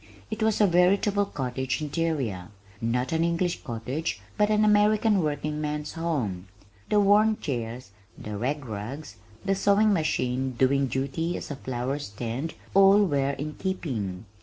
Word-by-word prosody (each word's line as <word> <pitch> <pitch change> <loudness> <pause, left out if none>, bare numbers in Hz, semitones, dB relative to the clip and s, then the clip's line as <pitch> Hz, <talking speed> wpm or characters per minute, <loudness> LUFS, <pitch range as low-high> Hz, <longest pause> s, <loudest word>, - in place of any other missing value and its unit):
It 215 - -4
was 220 -1 +2
a 210 - +6
veritable 200 +3 +3
cottage 130 -5 -3
interior 145 - -2 0.3
not 125 +3 0
an 165 0 +1
English 170 +1 0
cottage 125 +7 -3 0.2
but 210 0 +2
an 215 0 +3
American 210 -1 +4
working 150 0 -2
man's 150 0 -3
home. 130 - -2 0.4
The 210 - +4
worn 210 +2 +4
chairs, 120 -5 -4 0.3
the 105 0 -6
rag 135 +6 -2
rugs, 115 +7 -6 0.3
the 195 - +2
sewing 200 +2 +3
machine 130 -6 0
doing 135 +2 +2
duty 140 +7 -2
as - - -7
a - - -3
flowerstand, 130 +1 -4 0.2
all 195 +1 +6
were 140 -4 +1
in 150 +3 -5
keeping. 115 - -3
150 Hz, 140 wpm, -26 LUFS, 125-190 Hz, 0.4 s, a